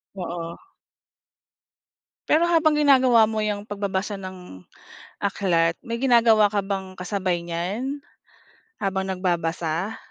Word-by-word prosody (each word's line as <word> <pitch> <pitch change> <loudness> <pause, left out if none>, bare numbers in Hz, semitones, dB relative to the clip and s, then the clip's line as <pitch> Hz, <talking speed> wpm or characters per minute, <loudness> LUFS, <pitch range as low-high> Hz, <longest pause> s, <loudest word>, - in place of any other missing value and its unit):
Oo. 170 -2 -5 1.7
Pero 320 +3 +4
habang 325 -3 +3
ginagawa 260 -5 +5
mo 220 - -1
'yang 210 -1 -2
pagbabasa 200 0 -2
ng 180 - -10 0.7
aklat, 170 -4 +1
may 230 0 -2
ginagawa 230 -4 +5
ka 205 - +3
bang 195 -1 -2
kasabay 185 -1 -1
niyan 200 +12 -4 0.8
habang 190 -1 -1
nagbabasa? 175 +1 -2
195 Hz, 100 wpm, -24 LUFS, 175-230 Hz, 1.7 s, ginagawa